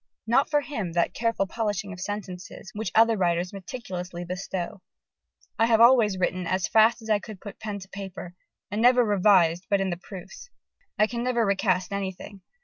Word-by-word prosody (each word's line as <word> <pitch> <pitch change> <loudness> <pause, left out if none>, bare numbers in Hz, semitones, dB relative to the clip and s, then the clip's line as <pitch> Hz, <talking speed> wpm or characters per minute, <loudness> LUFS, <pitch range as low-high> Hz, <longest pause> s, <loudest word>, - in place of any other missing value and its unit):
Not 240 +5 +3
for 295 -1 +2
him 215 - -4
that 170 0 +1
careful 230 -3 0
polishing 205 -1 -3
of 185 - -10
sentences, 190 -1 -6
which 210 -3 -4
other 225 0 +5
writers 175 -1 0
meticulously 185 -4 -6
bestow. 180 0 -5 0.8
"I 225 - +4
have 225 -1 +4
always 230 -5 +6
written 185 -1 -1
as 185 +1 0
fast 225 +1 +4
as 220 - -9
I 210 - +4
could 205 -1 -10
put 205 - -10
pen 210 -2 -4
to 190 -1 -10
paper, 190 -3 -8 0.4
and 210 +2 -1
never 245 0 +5
revised 185 -4 +3
but 200 - +3
in 190 -1 0
the 175 - -3
proofs.... 190 - -11 0.5
I 215 - +5
can 235 +1 -4
never 240 -2 +1
recast 190 -2 +1
anything. 195 0 -5
200 Hz, 180 wpm, -26 LUFS, 185-225 Hz, 0.8 s, always